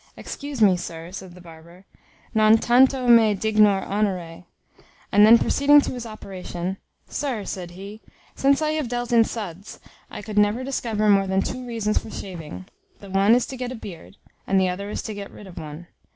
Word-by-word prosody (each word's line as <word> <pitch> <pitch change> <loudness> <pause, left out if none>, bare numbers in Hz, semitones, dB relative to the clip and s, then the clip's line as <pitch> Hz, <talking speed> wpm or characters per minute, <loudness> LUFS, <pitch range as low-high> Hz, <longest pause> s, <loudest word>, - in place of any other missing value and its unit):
"Excuse 280 -5 -4
me, 195 -3 +5
sir," 165 0 -8
said 185 -2 -9
the 180 - -14
barber, 170 +2 -15 0.5
"non 215 0 +5
tanto 255 +2 +3
me 225 -3 +6
dignor 210 -1 +3
honore." 185 -5 -2 0.7
And 205 +1 +6
then 230 +2 +9
proceeding 290 +4 +4
to - - -4
his 245 -2 -6
operation, 190 -3 -6 0.3
"Sir," 255 -9 -3
said 180 -2 -6
he, 200 +3 -10 0.3
"since 280 +2 +2
I 305 - +1
have 310 -4 -2
dealt 240 0 -3
in 230 -1 +6
suds, 200 -4 -7 0.3
I - - -8
could 210 -1 -1
never 210 +5 +2
discover 230 -5 -1
more 195 -1 +4
than 190 0 +1
two 255 0 -5
reasons 225 -3 -1
for - - -11
shaving; 160 - -8 0.3
the 200 -2 -12
one 195 +4 +4
is 245 - +1
to 265 - -8
get 250 0 -4
a - - -5
beard, 195 -3 -11 0.3
and 195 - +3
the 185 -1 +2
other 200 +3 -5
to 215 - -5
get 200 -1 -7
rid 210 - -13
of 185 -3 -10
one. 155 +2 -9
210 Hz, 190 wpm, -23 LUFS, 185-235 Hz, 0.7 s, then